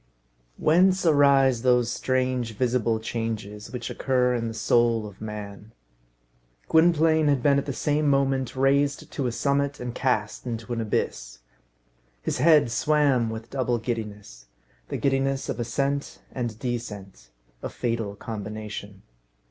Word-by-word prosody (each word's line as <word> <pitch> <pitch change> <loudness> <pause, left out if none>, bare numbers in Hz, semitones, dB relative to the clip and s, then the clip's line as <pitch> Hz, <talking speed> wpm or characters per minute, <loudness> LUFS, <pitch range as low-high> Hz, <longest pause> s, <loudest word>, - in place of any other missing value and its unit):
Whence 185 +4 +3
arise 140 -5 +4
those 125 -2 +3
strange, 130 -3 -1
visible 120 -3 +1
changes 110 -2 -4
which 125 -2 -5
occur 125 -2 +1
in 115 -1 -1
the 115 - -4
soul 115 -1 +2
of 105 -1 -11
man? 105 0 -8 0.9
Gwynplaine 160 -1 +4
had 140 -4 +2
been 140 -1 +4
at 140 - -6
the - - -1
same 150 +3 0
moment 135 -2 +1
raised 140 +3 +1
to 135 -4 -2
a - - -1
summit 140 +3 0
and 125 -1 -5
cast 120 -3 -1
into 115 0 -4
an 115 - -2
abyss. - - -2 0.8
His - - -3
head 150 -4 +5
swam 140 -3 +2
with 110 0 -7
double 125 -3 0
giddiness 105 - -6 0.4
the - - -2
giddiness 135 0 0
of - - -3
ascent 140 +4 -2
and 120 -4 -4
descent. 105 - -6 0.3
A - - -4
fatal 115 -4 -3
combination. 105 -2 -7
125 Hz, 135 wpm, -25 LUFS, 110-140 Hz, 0.9 s, head